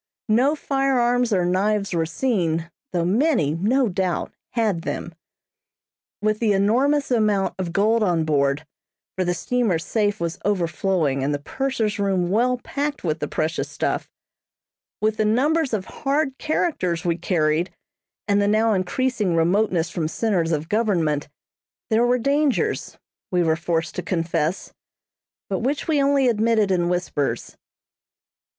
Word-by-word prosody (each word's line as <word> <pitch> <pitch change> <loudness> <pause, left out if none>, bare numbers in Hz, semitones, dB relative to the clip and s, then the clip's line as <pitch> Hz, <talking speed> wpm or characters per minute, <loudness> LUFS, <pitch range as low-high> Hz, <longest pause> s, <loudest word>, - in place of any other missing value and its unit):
No 255 +8 +3
firearms 250 -4 +1
or 185 -3 +2
knives 195 +2 0
were 165 -2 0
seen, 170 -5 -1 0.2
though 175 -3 0
many, 210 - +2
no 235 +10 +2
doubt, 185 -2 -2 0.2
had 215 -8 0
them. 170 - -4 1.1
With 215 0 +1
the 220 -3 +2
enormous 260 +9 +2
amount 210 -5 +2
of 180 -2 -2
gold 215 +5 +2
on 175 -6 +1
board 145 0 +1 0.5
(for 190 - 0
the 175 0 0
steamer's 205 -6 0
safe 210 -2 0
was 170 -1 -3
overflowing, 170 -6 0
and 145 +2 0
the 145 0 -8
purser's 250 -7 -1
room 190 -3 0
well 250 +4 +2
packed 285 +4 -4
with 160 -2 -1
the 150 - -2
precious 160 +3 -2
stuff), - - -2 0.9
with 215 0 +1
the - - +2
numbers 275 +8 +2
of 205 -4 -2
hard 280 +2 -1
characters 185 - -1
we 170 -1 +2
carried, 165 -1 0 0.6
and 205 -1 +3
the 200 - +2
now 220 +1 +3
increasing 205 0 0
remoteness 175 0 +1
from 160 -3 -2
centres 175 -2 0
of 155 0 -1
government, 170 -10 0 0.6
there 230 +2 +4
were 250 +1 +3
dangers, 280 +2 0 0.3
we 180 -1 +2
were 160 -1 +2
forced 165 0 -2
to - - 0
confess, 165 0 -2 0.7
but 190 - -2
which 275 +5 -2
we 305 -3 +2
only 275 -1 +3
admitted 220 -3 +2
in 175 -2 +1
whispers. 175 -5 -2
200 Hz, 145 wpm, -23 LUFS, 170-240 Hz, 1.1 s, there